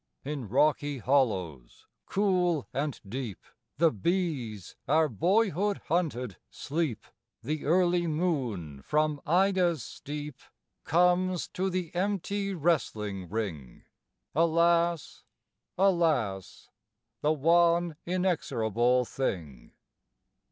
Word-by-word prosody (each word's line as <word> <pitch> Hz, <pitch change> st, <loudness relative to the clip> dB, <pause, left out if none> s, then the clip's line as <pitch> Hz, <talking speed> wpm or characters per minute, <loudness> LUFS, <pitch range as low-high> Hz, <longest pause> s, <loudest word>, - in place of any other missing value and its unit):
In 140 Hz, -7 st, -4 dB
rocky 145 Hz, +2 st, +2 dB
hollows 100 Hz, -, -1 dB, 0.2 s
cool 180 Hz, -6 st, +1 dB
and 145 Hz, 0 st, -2 dB
deep, 120 Hz, -2 st, -5 dB, 0.4 s
The 165 Hz, +1 st, +4 dB
bees 125 Hz, -, -2 dB
our 155 Hz, +2 st, +4 dB
boyhood 195 Hz, -, +1 dB
hunted 125 Hz, -, -1 dB
sleep; 140 Hz, -7 st, -3 dB, 0.4 s
The 155 Hz, 0 st, -3 dB
early 175 Hz, +2 st, +3 dB
moon 125 Hz, -, -2 dB
from 150 Hz, -, 0 dB
Ida's 180 Hz, -4 st, +2 dB
steep 145 Hz, 0 st, -7 dB, 0.5 s
Comes 180 Hz, +1 st, +2 dB
to 190 Hz, +1 st, -2 dB
the 180 Hz, -3 st, -3 dB
empty 200 Hz, +1 st, -1 dB
wrestling 105 Hz, -, -1 dB
ring. 85 Hz, -, -5 dB, 0.5 s
(Alas, 170 Hz, +1 st, +2 dB, 0.5 s
alas, 160 Hz, -, +1 dB, 0.5 s
The 150 Hz, +1 st, +3 dB
one 170 Hz, +2 st, +3 dB
inexorable 125 Hz, -, +1 dB
thing!) 85 Hz, -, -4 dB
155 Hz, 90 wpm, -29 LUFS, 120-175 Hz, 0.5 s, The